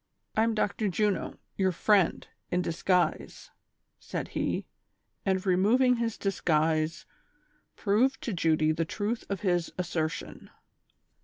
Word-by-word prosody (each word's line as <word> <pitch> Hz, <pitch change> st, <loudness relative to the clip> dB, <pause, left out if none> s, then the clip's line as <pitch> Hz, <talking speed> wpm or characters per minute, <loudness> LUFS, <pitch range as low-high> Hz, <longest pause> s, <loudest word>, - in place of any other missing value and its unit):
"I 220 Hz, -, +3 dB
am 225 Hz, 0 st, +2 dB
Dr. 210 Hz, 0 st, 0 dB
Juno, 205 Hz, +2 st, 0 dB, 0.2 s
your 190 Hz, -1 st, +2 dB
friend, 190 Hz, 0 st, +2 dB, 0.2 s
in 180 Hz, 0 st, 0 dB
disguise," 175 Hz, +2 st, 0 dB, 0.5 s
said -, -, -5 dB
he, -, -, -2 dB, 0.6 s
and 190 Hz, 0 st, +1 dB
removing 230 Hz, +7 st, +4 dB
his 230 Hz, -2 st, -2 dB
disguise 160 Hz, -4 st, 0 dB, 0.7 s
proved 225 Hz, +6 st, +2 dB
to 230 Hz, -, -2 dB
Judy 155 Hz, -2 st, +2 dB
the 155 Hz, +1 st, 0 dB
truth 210 Hz, +7 st, -3 dB
of 200 Hz, -3 st, -3 dB
his 175 Hz, -4 st, 0 dB
assertion. 170 Hz, -3 st, -3 dB
190 Hz, 120 wpm, -29 LUFS, 165-215 Hz, 0.7 s, removing